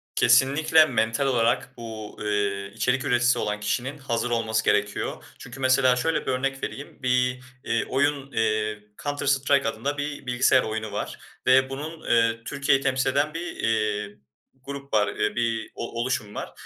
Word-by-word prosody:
Kesinlikle, 145 +6 +5
mental 115 0 0
olarak 125 0 +1
bu, 110 -2 -8
eee, 100 -1 -1
içerik 125 +3 0
üreticisi 120 +1 +3
olan 105 -1 -2
kişinin 125 +7 -2
hazır 120 -3 -2
olması 110 -1 0
gerekiyor. 105 -1 0 0.2
Çünkü 125 +2 -10
mesela 130 -1 +4
şöyle 160 +6 0
bir - - 0
örnek 135 +1 -2
vereyim. 140 -1 -7
Bir, 125 0 +1 0.2
iii, 115 - 0
oyun, 140 0 0
eee, 110 -2 0 0.2
Counter 145 0 -3
Strike 140 -1 +2
adında 140 +7 -3
bir 145 -1 -4
bilgisayar 125 +1 +3
oyunu 110 -1 -4
var - - -4 0.3
ve 130 +1 +5
bunun, 155 +4 -6
eee, 115 -1 +3
Türkiye'yi 140 -1 +1
temsil 130 0 +1
eden 145 +3 +1
bir, 170 +2 -5
eee, 105 -2 -1 0.5
grup 140 0 -8
var, 105 -2 +4
eee, 105 - -1
bir 115 -2 -1
o 115 - -5
oluşum 120 -4 -2
var. - - -5
125 Hz, 160 wpm, -25 LUFS, 110-135 Hz, 0.5 s, Kesinlikle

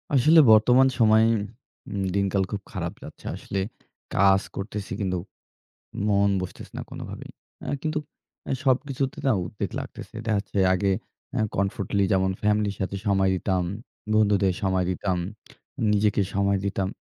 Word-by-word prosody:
আসলে 155 +6 +6
বর্তমান 125 +5 +6
সময়ে 110 0 +6 0.7
উম 100 - -1
দিনকাল 100 -1 +1
খুব 100 - -3
খারাপ - - -3
যাচ্ছে। - - -12
আসলে 95 - -4 0.6
কাজ 95 0 +5
করতেছি 100 0 -5
কিন্তু 95 -2 0 0.9
মন 100 0 +3
বসতেছে 90 - -8
না - - -3
কোনোভাবেই। - - -8 0.3
অ্যা - - -3
কিন্তু 155 -1 -1 0.5
অ্যা - - -1
সবকিছুতে 135 +1 0
তাও 130 -6 +3
উদ্বেগ 100 - -4
লাগতেছে। - - -9
দেখা 110 -2 +1
যাচ্ছে 100 0 -6 0.2
আগে 95 +1 +1 0.4
অ্যা - - 0
কমফোর্টলি 100 0 0
যেমন 95 0 +2
ফ্যামিলির 105 -1 +1
সাথে 95 +1 -2
সময় 95 -1 +3
দিতাম, 95 -1 0 0.5
বন্ধুদের 100 -3 +3
সময় 95 -1 +1
দিতাম, 95 0 -1 0.7
নিজেকে 105 0 +2
সময় 100 0 +2
দিতাম। 100 -1 -1
100 Hz, 140 wpm, -25 LUFS, 95-110 Hz, 0.9 s, আসলে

